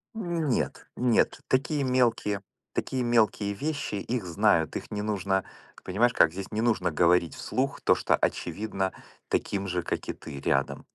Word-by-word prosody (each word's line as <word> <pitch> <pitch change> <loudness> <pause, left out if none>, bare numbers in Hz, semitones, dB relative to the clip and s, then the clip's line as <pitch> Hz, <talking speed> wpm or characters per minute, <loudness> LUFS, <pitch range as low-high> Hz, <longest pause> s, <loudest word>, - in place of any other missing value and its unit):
Нет, 170 - -1
нет, 125 -2 +2
такие 140 +2 +1
мелкие, 120 -6 +1 0.3
такие 130 -2 -1
мелкие 110 -3 +2
вещи- 140 -2 -3
их 115 +1 -2
знают, 85 -3 +2
их - - -5
не 105 0 -3
нужно, 100 -2 0 0.4
понимаешь 120 +6 +2
как, 80 - +5
здесь 95 +2 -6
не 110 +1 -1
нужно 110 -7 +2
говорить 85 +1 +3
вслух 135 +2 -2
то, - - +5
что - - +2
очевидно 100 -3 -1 0.4
таким 100 -1 -1
же, 90 -1 -1
как - - -3
и - - 0
ты 70 - -9
рядом. 70 0 0
105 Hz, 155 wpm, -28 LUFS, 95-125 Hz, 0.4 s, как